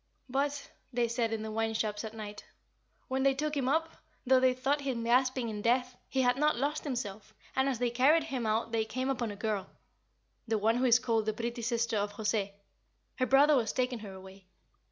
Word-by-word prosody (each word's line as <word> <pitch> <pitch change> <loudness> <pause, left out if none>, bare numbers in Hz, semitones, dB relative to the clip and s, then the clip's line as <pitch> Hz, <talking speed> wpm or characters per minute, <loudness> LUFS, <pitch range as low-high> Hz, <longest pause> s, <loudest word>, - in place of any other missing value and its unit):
"But," 280 +2 -2 0.2
they 240 -1 +1
said 230 -1 -1
in 220 -1 -2
the 220 - -5
wine 225 0 -1
shops 215 -1 -1
at 220 0 -7
night, 210 -1 -7 0.6
"when 265 +1 -1
they 270 0 +3
took 300 +2 -2
him 265 -2 0
up, 320 +3 0 0.3
though 260 0 +5
they 255 0 +3
thought 275 +3 0
him 260 -4 -2
gasping 255 +1 +2
in 210 -2 -4
death, 250 +2 +1
he 265 -1 +1
had 245 0 +3
not 300 +2 +3
lost 290 +5 -1
himself; 215 -5 -5 0.2
and 265 +1 +2
as 260 - -1
they 245 0 0
carried 280 +7 +4
him 260 -7 -3
out 220 +1 0
they 225 -1 +1
came 255 +4 -2
upon 240 -4 -2
a 205 - -6
girl 210 -2 -2 0.8
the 220 -1 +1
one 220 +3 +2
who 255 - +1
is 240 -1 +6
called 225 -3 0
'the 215 - +1
pretty 235 +2 -4
sister 235 -1 0
of 205 0 -1
José' 205 -1 -1 0.6
her 255 - +1
brother 290 +3 +6
was 235 -4 +1
taking 250 -1 -1
her 205 -3 -8
away. 190 0 -13
240 Hz, 215 wpm, -31 LUFS, 220-265 Hz, 0.8 s, is